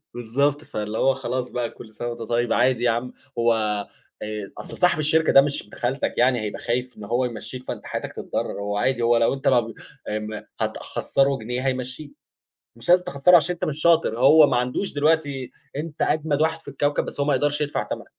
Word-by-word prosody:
بالضبط. 140 Hz, +5 st, 0 dB
فاللي 105 Hz, -3 st, -4 dB
هو 135 Hz, -, +3 dB
خلاص 130 Hz, -1 st, -3 dB
بقى 120 Hz, -2 st, -2 dB
كل 110 Hz, -1 st, -13 dB
سَنة 120 Hz, +3 st, -5 dB
وأنت 120 Hz, 0 st, -7 dB
طيب، 120 Hz, +1 st, 0 dB
عادي 125 Hz, 0 st, +2 dB
يا 120 Hz, -, +4 dB
عم، 120 Hz, +2 st, -3 dB, 0.3 s
هو 115 Hz, 0 st, +4 dB, 0.7 s
آآ 105 Hz, -2 st, -5 dB
أصل -, -, -8 dB
صاحب 180 Hz, -4 st, +3 dB
الشركة 160 Hz, +1 st, +3 dB
ده 135 Hz, -, +9 dB
مش 140 Hz, 0 st, -1 dB
ابن 105 Hz, -, -15 dB
خالتك 130 Hz, +3 st, -1 dB
يعني 125 Hz, 0 st, +3 dB
هيبقى 105 Hz, -1 st, -4 dB
خايف 125 Hz, +1 st, -2 dB
إن 105 Hz, -, -9 dB
هو 120 Hz, +4 st, 0 dB
يمشّيك 125 Hz, +2 st, -7 dB
فأنت -, -, -5 dB
حياتك -, -, -5 dB
تتضرّر، -, -, -4 dB
هو 105 Hz, 0 st, -2 dB
عادي، 125 Hz, +2 st, +1 dB
هو 120 Hz, 0 st, +4 dB
لو 115 Hz, +3 st, +3 dB
أنت 135 Hz, +1 st, -3 dB
ما 125 Hz, -2 st, +5 dB
ب 115 Hz, -1 st, -5 dB, 0.4 s
ام 105 Hz, 0 st, -4 dB, 0.2 s
هتخسّره 135 Hz, 0 st, 0 dB
جنيه، 125 Hz, +4 st, -3 dB
هيمشّيك، 130 Hz, -, -4 dB, 0.6 s
مش -, -, -11 dB
لازم 180 Hz, 0 st, +5 dB
تخسّره 140 Hz, +6 st, +5 dB
عشان 170 Hz, +2 st, +2 dB
أنت 170 Hz, -, -3 dB
مش 155 Hz, 0 st, -3 dB
شاطر، 165 Hz, -9 st, +3 dB
هو 150 Hz, +4 st, +7 dB
ما 125 Hz, -, +1 dB
عندوش 125 Hz, +10 st, -1 dB
دلوقتي 145 Hz, -3 st, 0 dB, 0.3 s
أنت 150 Hz, 0 st, -4 dB
أجمد 150 Hz, -1 st, +1 dB
واحد 160 Hz, 0 st, 0 dB
في -, -, -16 dB
الكوكب، 145 Hz, +1 st, 0 dB
بس -, -, -6 dB
هو 140 Hz, -, +1 dB
ما 145 Hz, -, +3 dB
يقدرش 145 Hz, +2 st, +1 dB
يدفع 150 Hz, 0 st, -1 dB
تَمَنك. -, -, -6 dB
130 Hz, 210 wpm, -23 LUFS, 120-145 Hz, 0.7 s, ده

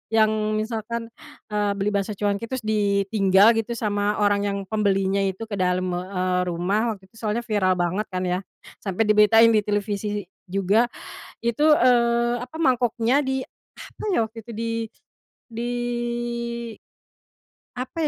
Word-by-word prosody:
yang 215 Hz, -1 st, +5 dB, 0.2 s
misalkan, 225 Hz, +1 st, -3 dB, 0.4 s
eee, 210 Hz, -1 st, 0 dB
beli 200 Hz, +1 st, 0 dB
bakso 200 Hz, +1 st, -1 dB
cuanki 205 Hz, +2 st, -1 dB
terus 260 Hz, +1 st, -4 dB
ditinggal 200 Hz, 0 st, +3 dB
gitu 225 Hz, +2 st, -1 dB
sama 210 Hz, -1 st, -1 dB
orang 205 Hz, 0 st, +2 dB
yang 200 Hz, 0 st, -1 dB
pembelinya 200 Hz, -2 st, +1 dB
itu 190 Hz, +2 st, -3 dB
ke 205 Hz, -, -3 dB
dalam 185 Hz, 0 st, 0 dB
me 175 Hz, 0 st, -1 dB
eee, 185 Hz, -1 st, 0 dB
rumah, 200 Hz, +7 st, 0 dB
waktu 190 Hz, -2 st, -16 dB
itu 225 Hz, -, -21 dB
soalnya 220 Hz, +1 st, -1 dB
viral 200 Hz, -5 st, +2 dB
banget 180 Hz, +4 st, 0 dB
kan 185 Hz, -, -1 dB
ya. 180 Hz, 0 st, 0 dB, 0.4 s
Sampai 195 Hz, +1 st, -2 dB
diberitain 225 Hz, +2 st, +6 dB
di 215 Hz, -2 st, +4 dB
televisi 205 Hz, 0 st, -1 dB, 0.2 s
juga. 195 Hz, +5 st, +2 dB, 0.6 s
Itu, 265 Hz, +7 st, +2 dB
eee, 240 Hz, -2 st, +3 dB
apa, 250 Hz, +5 st, -9 dB
mangkoknya, 250 Hz, -2 st, +2 dB
di 265 Hz, -1 st, -1 dB, 0.4 s
apa -, -, -10 dB
ya -, -, +2 dB
waktu 225 Hz, +1 st, -13 dB
itu 235 Hz, -, -12 dB
di 230 Hz, +1 st, -3 dB, 0.8 s
di 235 Hz, +2 st, -3 dB, 2.1 s
apa 300 Hz, +5 st, -2 dB
210 Hz, 145 wpm, -24 LUFS, 195-230 Hz, 2.1 s, diberitain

